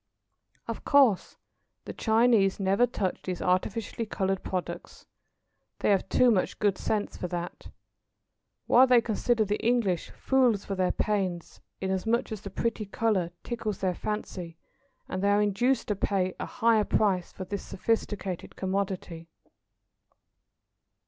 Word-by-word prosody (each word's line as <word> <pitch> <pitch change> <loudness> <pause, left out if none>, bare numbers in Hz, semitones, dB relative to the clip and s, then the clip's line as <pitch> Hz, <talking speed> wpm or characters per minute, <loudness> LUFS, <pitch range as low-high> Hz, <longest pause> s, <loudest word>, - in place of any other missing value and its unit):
Of - - -5
course 270 -9 +3 0.5
the - - -6
Chinese 220 -4 +3
never 195 +5 +3
touch 195 -6 -2
these 180 -2 -4
artificially 210 +5 -1
coloured 190 -2 -1
products. 185 -2 -5 0.7
They - - +1
have 195 -2 +1
too 250 -1 +5
much 190 -5 0
good 205 -2 +2
sense 210 -1 -2
for 180 - -3
that. 175 0 -5 1.0
While 255 +2 +6
they 250 -1 +6
consider 230 0 +1
the 205 +1 -2
English 225 -8 +1
fools 250 -6 +1
for 200 - -3
their 185 -1 +1
pains, 190 -5 -2 0.2
inasmuch 190 +6 0
as 215 -2 -5
the 200 - -7
pretty 215 +1 -2
colour 200 -5 0
tickles 225 -4 -3
their 185 -2 0
fancy, 180 -4 -5 0.5
and 185 - -3
they 200 - +2
are 205 0 +4
induced 240 +6 +1
to 210 - +1
pay 190 -2 0
a - - -3
higher 230 -2 +3
price 190 -4 +1
for 185 - -7
the 200 +2 -4
sophisticated 200 -3 -3
commodity. 185 -3 -3
200 Hz, 135 wpm, -28 LUFS, 185-225 Hz, 1.0 s, While